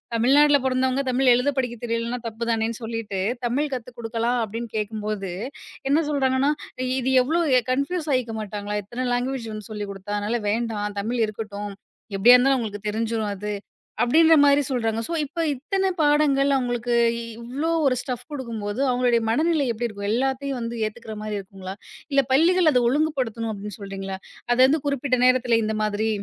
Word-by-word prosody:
தமிழ்நாட்டுல 285 +5 +5
பொறந்தவங்க 260 +1 +1
தமிழ் 255 0 +4
எழுதப் 270 +3 0
படிக்கத் 240 -2 -3
தெரியலன்னா 230 +1 -2
தப்பு 230 +1 -4
தானேன்னு 225 0 -1
சொல்லிட்டு 225 -4 -4 0.3
"தமிழ் 280 +5 0
கத்து 250 0 -7
கொடுக்கலாம்" 230 +1 -1
அப்டின்னு 225 +2 -6
கேக்கும்போது 210 -2 -3 0.6
என்ன 305 +4 +3
சொல்றாங்கன்னா, 270 0 +2 0.5
"இது 260 +1 0
எவ்ளோ 325 +6 +1 0.2
அ - - -21
கன்புயூஸ் 300 +5 -1
ஆயிக்கமாட்டாங்களா? 215 -4 -3
இத்தனை 240 +6 -4
லாங்குவேஜ் 235 -4 -4
சொல்லிக் 205 -2 -4
குடுத்தா 195 +1 -5
அதனால 210 +4 -1
வேண்டாம். 210 -2 -2
தமிழ் 235 +3 -1
இருக்கட்டும். 205 -1 -6 0.4
எப்படியா 240 +6 +8
இருந்தாலும் 270 +2 +3
அவங்களுக்குத் 210 -3 -4
தெரிஞ்சுரும் 220 -1 -1
அது." 210 +2 -4 0.5
அப்படின்ற 320 +6 +6
மாதிரி 285 0 +5
சொல்றாங்க. 225 -4 0
ஸோ - - -4
இப்போ 305 +4 -4
இத்தனை 385 +9 -1
பாடங்கள் 290 -2 +3
அவங்களுக்கு 245 -1 -1 0.5
இவ்ளோ 265 +7 -3 0.2
1 260 -2 +3
ஸ்டஃப் 250 -3 -5
கொடுக்கும்போது, 230 -6 -4
அவங்களுடைய 245 -2 +2
மனநிலை 310 +4 +2
எப்படி 235 +1 -2
இருக்கும்? 200 -2 -6
எல்லாத்தையும் 265 0 -1 0.2
ஏத்துக்கற 220 +1 -6
மாதிரி 215 -1 -3
இருக்குங்களா? 190 -1 -8 0.4
இல்ல 275 0 +5
பள்ளிகள் 335 +5 +5
அதை 250 - +4
ஒழுங்குபடுத்தணும் 255 -6 0
அப்டின்னு 205 -1 -7
சொல்றீங்களா? 195 -1 -5 0.4
அது 245 - +2
வந்து 305 +4 +2
குறிப்பிட்ட 275 -2 0
நேரத்துல 250 -2 +4
இந்த 215 0 -1
மாதிரி. 215 +1 0
240 Hz, 150 wpm, -24 LUFS, 215-270 Hz, 0.6 s, எப்படியா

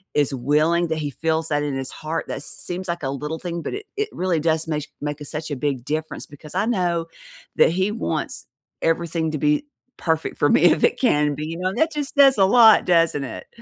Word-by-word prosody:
is 145 -1 +2
willing, 155 +7 +2
that 160 - -1
he 145 -1 -3
feels 160 +3 -1
that 145 -1 +1
in 145 -2 -2
his 135 -1 -5
heart, 155 +2 -4
that 135 - -5
seems 180 +1 -6
like 170 -3 -3
a 135 - -1
little 150 +4 -4
thing, 170 -1 -4
but - - -5
it 420 +1 -7
it 425 +1 -1
really 180 -3 0
does 160 0 0
meish 150 -2 -2
make 145 0 -4
a - - -6
such 155 +2 -5
a - - -1
big 130 -2 -2
difference 155 +1 -4
because 150 +3 -12
I 200 +3 +1
know 175 -7 0 0.5
that - - +6
he 190 +4 0
wants 225 - -3 0.3
everything 165 -1 0
to 155 - -2
be 150 - +1 0.3
perfect 160 -1 -1
for - - +3
me - - +4
if - - +4
it 470 - +3
can 150 - +2
be, 150 +1 -5
you 165 +1 -5
know? 185 - 0
And 190 - -6
that 320 0 +3
just 295 -1 -4
says 275 -4 +7
a 190 - +5
lot, 225 +1 +7
doesn't 165 -5 +3
it? 125 - -7
160 Hz, 235 wpm, -22 LUFS, 150-180 Hz, 0.5 s, says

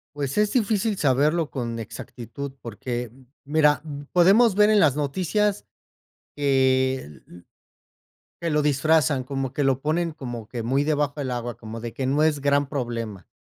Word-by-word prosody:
Pues 140 +5 -2
es 210 -1 +2
difícil 215 -3 +1
saberlo 150 +3 +2
con 115 -3 -4
exactitud, 120 +5 -7
porque 120 +1 -5 0.3
mira, 150 -1 +3 0.3
podemos 195 +5 +5
ver 210 +1 +5
en 210 -2 +5
las 145 -3 +4
noticias 190 +8 0 0.7
que 130 - +1 1.2
que 170 -1 -2
lo 150 0 +2
disfrazan 145 -2 +2
como 135 -1 -4
que 145 - 0
lo 135 -1 +2
ponen 165 +3 0
como 120 -7 -7
que 120 -1 -5
muy 135 +5 +1
debajo 150 -2 0
del 135 -3 -3
agua, 120 -1 -4
como 115 0 -8
de 120 -1 -6
que 135 - -3
no 145 +3 +2
es 155 -2 +2
gran 140 0 +2
problema 115 -8 -4
140 Hz, 150 wpm, -24 LUFS, 125-155 Hz, 1.2 s, podemos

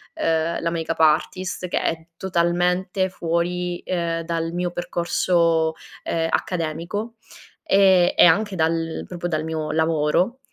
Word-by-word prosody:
ehm, 165 +1 0
la 170 - 0
make 165 -1 -4
up - - -4
artist, 180 +4 +1
che - - -1
è 165 0 -2
totalmente 180 +1 0
fuori, 175 0 -2
ehm, 170 -2 -1
dal 165 0 -2
mio 175 0 -2
percorso, 170 -2 +1 0.3
ehm, 165 -1 -1
accademico, 175 +8 -3 0.5
ehm, 190 -3 +4
e - - +7
anche 195 +4 +3
dal 165 -1 -1
proprio 175 -1 -4
dal 155 -3 -1
mio 160 -1 -3
lavoro. 160 - +1
170 Hz, 130 wpm, -22 LUFS, 165-180 Hz, 0.5 s, e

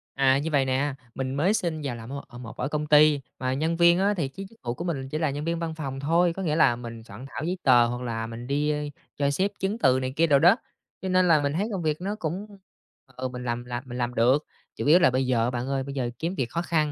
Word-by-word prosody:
À, 135 -1 +4
như 155 +3 -2
vậy 140 -2 +3
nè, 135 +2 0 0.2
mình 130 0 -3
mới 180 +9 +2
xin 170 -7 -1
vào 130 -4 -3
làm 115 +1 -9
ở 140 - -4
ở 120 - -12
một 115 -2 -9
ở - - -1
công 150 0 -2
ty 150 -1 +6 0.2
mà 130 0 -1
nhân 160 +4 0
viên 170 +1 +5
á, 200 +2 +3
thì 165 -8 -1
chứ 195 +9 -8
chức 225 - -22
vụ 120 - -2
của 170 - -6
mình 135 -6 -3
chỉ 155 - -3
là 155 -2 +1
nhân 145 +3 -4
viên 170 0 -1
văn 165 -1 -3
phòng 135 -4 -5
thôi, 165 +4 +2
có 195 - -6
nghĩa 155 -3 0
là 120 -7 +4
mình 115 -1 -8
soạn 110 +4 -10
thảo - - -5
giấy 180 +3 -2
tờ 120 -3 +6
hoặc 120 +1 -3
là 115 -2 -3
mình 115 +1 -8
đi, 145 +2 +1
a, 150 - -1 0.4
cho 140 -1 +1
xếp 190 +8 0
chứng 195 +4 -1
từ 130 - +4
này 130 0 -3
kia 165 +2 +3
đồ 140 -2 +5
đó, 175 +7 +6 0.5
cho 190 - -3
nên 185 0 +3
là 155 -3 +5
mình 140 - 0
thấy 195 +7 0
công 190 - -2
việc 155 0 -1
nó 200 +3 -2
cũng, 175 +4 -3 0.7
ừ, 130 +1 -3
mình 125 0 -7
làm 120 0 -3
làm 120 0 -5
mình 125 0 -6
làm 120 0 -1
được. 125 +6 +3 0.3
Chủ - - -4
yếu 155 +5 +7
là 130 - +5
bây 130 +1 +1
giờ 120 -3 +2
á 120 - +1
bạn 125 0 -3
ơi, 135 -1 -1
bây 140 +1 -6
giờ 125 -3 -2
kiếm 170 +4 -2
việc 125 -8 -2
khó 170 - -2
khăn, 155 -4 0
140 Hz, 295 wpm, -26 LUFS, 125-165 Hz, 0.7 s, yếu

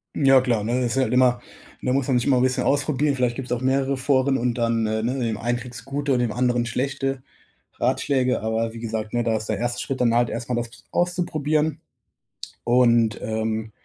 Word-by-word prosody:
Hm, - - -1
ja, 135 -1 +7
klar, 120 -5 0
ne, 120 +4 0
das 120 -1 0
ist - - -3
halt 115 - -2
immer 125 -1 +3 0.4
ne, 125 - -1
muss 135 -1 0
man 130 -3 +2
sich 120 - 0
immer 135 -3 +4
'n - - +2
bisschen 130 0 +1
ausprobieren, 145 0 +1
vielleicht 125 -2 0
gibt's 130 -1 -6
auch 125 0 -1
mehrere 135 +1 +1
Foren 135 0 +2
und 120 0 0
dann, 115 -2 +1
äh, 110 0 -1
ne, 120 +3 0
in - - -3
dem 115 -3 -1
einem 120 +2 -1
kriegst 120 -3 -9
gute 140 +1 -1
und 125 - +1
dem 120 -2 0
anderen 120 0 +1
schlechte 135 +2 -2 0.6
Ratschläge, 130 -2 +1
aber 110 +1 -1
wie 115 - -8
gesagt, 110 -1 -4
ne, 120 0 +1
da 115 -1 +1
ist 110 0 -3
der 110 - 0
1. 120 +2 -2
Schritt 135 - -4
dann 120 -2 +3
halt 120 0 +3
erst 115 0 -5
mal 125 - 0
das 120 0 -2
ps 120 - -18
auszuprobieren 155 -3 0 0.8
und, 120 -2 +3
ähm, 110 0 -2
125 Hz, 230 wpm, -23 LUFS, 115-135 Hz, 0.8 s, ja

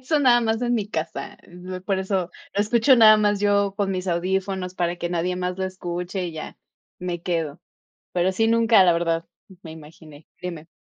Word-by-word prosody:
Eso 300 +4 0
nada 245 -3 +5
más 225 +1 -1
en 245 0 +1
mi 215 -4 -1
casa, 160 -6 -5 0.5
por 195 -1 0
eso 190 -2 -1 0.2
lo 200 - +1
escucho 235 +5 +4
nada 215 -2 +8
más 205 -1 +1
yo 200 -1 +2
con 200 -2 0
mis 185 0 -3
audífonos 185 +1 -2
para 175 -1 -1
que 175 0 -3
nadie 175 +1 -1
más 180 0 -3
lo 190 - -1
escuche 180 0 -4
y 170 - -6
ya, 160 - -8 0.4
me 175 -2 -4
quedo. 165 -5 -2 0.5
Pero 180 +1 +1
sí, 225 +4 +1
nunca, 230 -3 +5
la 175 -2 +5
verdad, 165 0 -1 0.4
me 160 - -10
imaginé 155 -1 -14 0.2
dime. 170 -3 -6
185 Hz, 190 wpm, -23 LUFS, 175-205 Hz, 0.5 s, nada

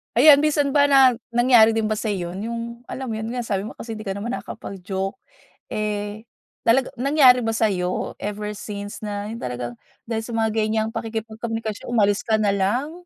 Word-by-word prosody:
Ayan, 285 +3 +8
minsan 290 -2 +2
ba 285 0 +4
na 270 -2 +7 0.2
nangyari 240 -2 +6
din 220 -1 0
ba 215 - 0
sa'yo 190 -6 -2
yun, 200 +4 -5
yung 235 0 -3 0.3
alam 260 -3 -5
mo 220 - -3
yun 220 - -4
nga 245 - -2
sabi 200 -1 -2
mo - - -9
kasi 225 -2 -7
hindi 215 - -8
ka 195 - -2
naman 225 +4 -4
nakakapag-joke, 195 -4 -5 0.5
eh, 210 +1 -3 0.4
talaga 255 +3 +3
nangyari 270 -2 +6
ba 225 -2 -1
sa'yo 185 -5 0
ever 210 +1 -4
since 205 0 -7
na 205 0 -4
yun 230 - -6
talagang 120 - -5 0.2
dahil 225 -1 -2
sa 235 - -5
mga 220 -1 +1
ganyang 220 0 0
pakikipagkomunikasyon, 225 -1 -4
umalis 210 -2 +1
ka 220 - +3
nalang. 210 +7 +1
220 Hz, 180 wpm, -23 LUFS, 205-235 Hz, 0.5 s, Ayan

